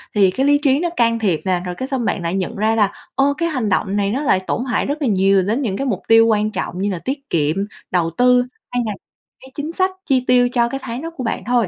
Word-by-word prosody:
thì 195 Hz, -3 st, +4 dB
cái 265 Hz, +7 st, 0 dB
lý 290 Hz, 0 st, +4 dB
trí 275 Hz, 0 st, +3 dB
nó 345 Hz, -, 0 dB
can 230 Hz, -1 st, +2 dB
thiệp 190 Hz, -8 st, 0 dB
nè, 185 Hz, -2 st, +1 dB
rồi 180 Hz, -1 st, -4 dB
cái 260 Hz, -, -4 dB
xong 260 Hz, -4 st, -2 dB
bạn -, -, -1 dB
lại 170 Hz, 0 st, -2 dB
nhận 190 Hz, -2 st, -2 dB
ra 220 Hz, +2 st, +1 dB
là 205 Hz, -3 st, +2 dB, 0.2 s
"Ô! 280 Hz, +1 st, +3 dB
Cái 335 Hz, 0 st, 0 dB
hành 255 Hz, -8 st, -1 dB
động 195 Hz, +1 st, 0 dB
này 200 Hz, -1 st, +1 dB
nó 265 Hz, -, -1 dB
lại 190 Hz, -, +3 dB
tổn 245 Hz, -, -1 dB
hại 245 Hz, -5 st, 0 dB
rất 290 Hz, +2 st, -3 dB
là 280 Hz, -, +1 dB
nhiều 195 Hz, -2 st, +3 dB
đến 225 Hz, +8 st, -1 dB
những 195 Hz, -7 st, -2 dB
cái 275 Hz, -, -2 dB
mục 195 Hz, -5 st, -1 dB
tiêu 225 Hz, 0 st, +6 dB
quan 215 Hz, -1 st, +1 dB
trọng 185 Hz, -3 st, -4 dB
như 205 Hz, -, 0 dB
là 180 Hz, -, -3 dB
tiết 275 Hz, +1 st, -4 dB
kiệm, 155 Hz, -1 st, +1 dB, 0.4 s
đầu 175 Hz, -3 st, +1 dB
tư 250 Hz, 0 st, +4 dB, 0.3 s
hay 245 Hz, 0 st, 0 dB
là 215 Hz, -, -2 dB, 0.5 s
cái 265 Hz, -, -14 dB
chính 300 Hz, +2 st, -4 dB
sách 375 Hz, +1 st, +1 dB
chi 260 Hz, -3 st, +2 dB
tiêu 245 Hz, -1 st, +4 dB
cho 235 Hz, -1 st, +2 dB
cái 270 Hz, +2 st, -4 dB
tháng 235 Hz, +3 st, -5 dB
đó 330 Hz, +1 st, -5 dB
của 255 Hz, -, -4 dB
bạn 225 Hz, -, -2 dB
thôi." 245 Hz, -5 st, +2 dB
230 Hz, 285 wpm, -19 LUFS, 195-265 Hz, 0.5 s, tiêu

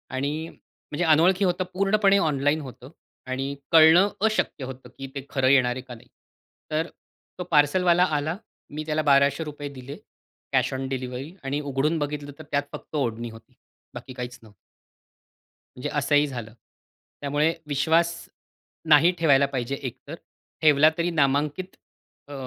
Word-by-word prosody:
आणि 150 Hz, +4 st, -2 dB
म्हणजे 150 Hz, +4 st, -8 dB
अनोळखी 175 Hz, +5 st, +4 dB
होतं 180 Hz, +1 st, 0 dB
पूर्णपणे 200 Hz, +1 st, +3 dB
ऑनलाईन 150 Hz, -3 st, +1 dB
होतं. 130 Hz, -1 st, -11 dB, 0.4 s
आणि 135 Hz, +2 st, -3 dB, 0.2 s
कळणं 165 Hz, +5 st, +7 dB, 0.2 s
अशक्य 215 Hz, -9 st, 0 dB
होतं, 130 Hz, -1 st, -10 dB
की 135 Hz, 0 st, -6 dB
ते 140 Hz, -1 st, -6 dB
खरं 135 Hz, -2 st, +1 dB
येणार 125 Hz, -3 st, +4 dB
आहे 130 Hz, -, -5 dB
का 125 Hz, -1 st, -10 dB
नाही. -, -, -18 dB, 0.6 s
तर 160 Hz, +2 st, 0 dB, 0.5 s
तो -, -, -2 dB
पार्सलवाला 170 Hz, +4 st, +4 dB
आला. 155 Hz, +5 st, -2 dB, 0.3 s
मी 155 Hz, +1 st, -5 dB
त्याला 155 Hz, 0 st, 0 dB
₹1200 145 Hz, +1 st, +1 dB
दिले, 130 Hz, +2 st, -9 dB, 0.6 s
कॅश -, -, +2 dB
ऑन 130 Hz, 0 st, -3 dB
डिलिव्हरी 130 Hz, +4 st, -5 dB
आणि 140 Hz, +2 st, -2 dB
उघडून 145 Hz, +3 st, 0 dB
बघितलं, 145 Hz, 0 st, -4 dB
तर -, -, -8 dB
त्यात 145 Hz, 0 st, +1 dB
फक्त -, -, -9 dB
ओढणी 120 Hz, -4 st, -2 dB
होती. 115 Hz, +3 st, -16 dB, 0.4 s
बाकी 125 Hz, +2 st, -8 dB
काहीच 125 Hz, -1 st, -7 dB
नव्हतं. 110 Hz, -2 st, -17 dB, 1.2 s
म्हणजे 125 Hz, -, -4 dB
असंही 145 Hz, 0 st, +2 dB
झालं. 120 Hz, -5 st, -7 dB, 0.7 s
त्यामुळे 145 Hz, +3 st, +1 dB
विश्वास 160 Hz, +4 st, +2 dB, 0.8 s
नाही 155 Hz, +4 st, +7 dB
ठेवायला 140 Hz, -4 st, +4 dB
पाहिजे 135 Hz, -1 st, -3 dB
एकतर. 140 Hz, +3 st, -8 dB, 0.5 s
ठेवला 150 Hz, 0 st, +6 dB
तरी 170 Hz, +1 st, 0 dB
नामांकित 150 Hz, +4 st, 0 dB, 0.5 s
अ, 145 Hz, -, -10 dB
145 Hz, 140 wpm, -25 LUFS, 135-160 Hz, 1.2 s, कळणं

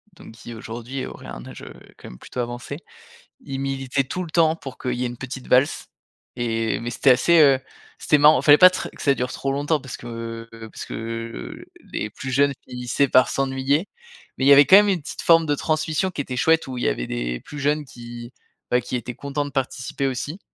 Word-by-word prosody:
donc -, -, -13 dB
qui 115 Hz, +1 st, -11 dB
aujourd'hui 120 Hz, +4 st, -6 dB
auraient -, -, -10 dB
un -, -, -8 dB
âge, -, -, -10 dB
heu, -, -, -10 dB, 0.2 s
quand -, -, -11 dB
même, -, -, -12 dB
plutôt 125 Hz, -, -9 dB
avancé, 120 Hz, +3 st, -4 dB, 0.6 s
ils 135 Hz, -, -6 dB
militaient 135 Hz, 0 st, -1 dB
tout 180 Hz, +7 st, -4 dB
le 170 Hz, -, -8 dB
temps 160 Hz, -1 st, +3 dB
pour 140 Hz, -5 st, -9 dB
qu'il 125 Hz, -, -3 dB
y 125 Hz, +1 st, -2 dB
ait -, -, 0 dB
une 120 Hz, 0 st, -8 dB
petite 130 Hz, 0 st, -7 dB
valse 130 Hz, +3 st, +2 dB, 0.5 s
et 115 Hz, -2 st, -1 dB
mais 120 Hz, -, -4 dB
c'était 130 Hz, +3 st, +3 dB
assez, 165 Hz, +7 st, +4 dB
heu, 135 Hz, -3 st, +5 dB, 0.4 s
c'était 150 Hz, -, +3 dB
marrant. 150 Hz, +2 st, +6 dB
Il -, -, -5 dB
fallait 145 Hz, 0 st, +8 dB
pas 185 Hz, +2 st, +9 dB
tr 185 Hz, -, -5 dB
que -, -, -13 dB
ça 140 Hz, -, +3 dB
dure 125 Hz, 0 st, -3 dB
trop 135 Hz, -, -2 dB
longtemps 145 Hz, +2 st, 0 dB
parce 130 Hz, -2 st, -8 dB
que, 115 Hz, -1 st, -7 dB
heu, 115 Hz, -1 st, -10 dB
parce -, -, -8 dB
que, -, -, -8 dB
heu, 115 Hz, -, -6 dB, 0.3 s
les 105 Hz, -, -3 dB
plus 130 Hz, +5 st, -7 dB
jeunes, 140 Hz, +2 st, +3 dB
finissaient 125 Hz, +2 st, -1 dB
par 130 Hz, +1 st, +5 dB
s'ennuyer. 135 Hz, +5 st, 0 dB, 0.5 s
Mais 130 Hz, -, 0 dB
il -, -, +4 dB
y 140 Hz, -, +9 dB
avait 140 Hz, +1 st, +8 dB
quand 190 Hz, -, +8 dB
même 205 Hz, 0 st, +5 dB
une 190 Hz, -5 st, +1 dB
petite 145 Hz, -, -7 dB
forme 165 Hz, -1 st, +5 dB
de 145 Hz, -1 st, +1 dB
transmission 155 Hz, +4 st, -1 dB
qui 175 Hz, -, -4 dB
était 130 Hz, -2 st, -5 dB
chouette 160 Hz, +4 st, +3 dB
où 130 Hz, -1 st, -6 dB
il 120 Hz, -, -2 dB
y -, -, +3 dB
avait -, -, -1 dB
des -, -, -3 dB
plus 150 Hz, -, -9 dB
jeunes 150 Hz, +2 st, +1 dB
qui, 120 Hz, -1 st, -10 dB, 0.4 s
bah, 125 Hz, -, +3 dB
qui 125 Hz, -, -5 dB
étaient 125 Hz, 0 st, -4 dB
contents 140 Hz, +3 st, -3 dB
de 145 Hz, -, -7 dB
participer 135 Hz, +1 st, -2 dB
aussi. 135 Hz, +7 st, -4 dB
130 Hz, 235 wpm, -23 LUFS, 120-145 Hz, 0.6 s, pas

